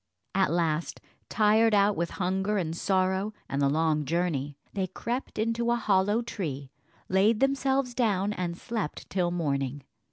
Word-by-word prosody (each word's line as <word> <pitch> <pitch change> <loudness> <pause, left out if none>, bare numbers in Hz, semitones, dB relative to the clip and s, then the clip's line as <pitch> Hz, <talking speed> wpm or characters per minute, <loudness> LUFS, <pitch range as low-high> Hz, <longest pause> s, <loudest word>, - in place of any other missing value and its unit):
At 195 -1 +3
last, 165 -1 0 0.3
tired 215 +1 +4
out 200 0 +4
with 170 +1 -1
hunger 190 +3 0
and 165 -4 -2
sorrow, 190 +3 0
and 140 - -2
the 140 - +3
long 155 0 +1
journey, 145 -3 -1 0.2
they 190 -2 -1
crept 240 +8 -4
into 230 +2 0
a 240 - +3
hollow 205 0 +2
tree, 145 - -5 0.4
laid 205 +4 +3
themselves 270 -1 +1
down, 205 -4 +1
and 175 -3 -3
slept 220 -8 -4
till 180 -2 +1
morning. 140 -5 -2
190 Hz, 150 wpm, -28 LUFS, 165-215 Hz, 0.4 s, tired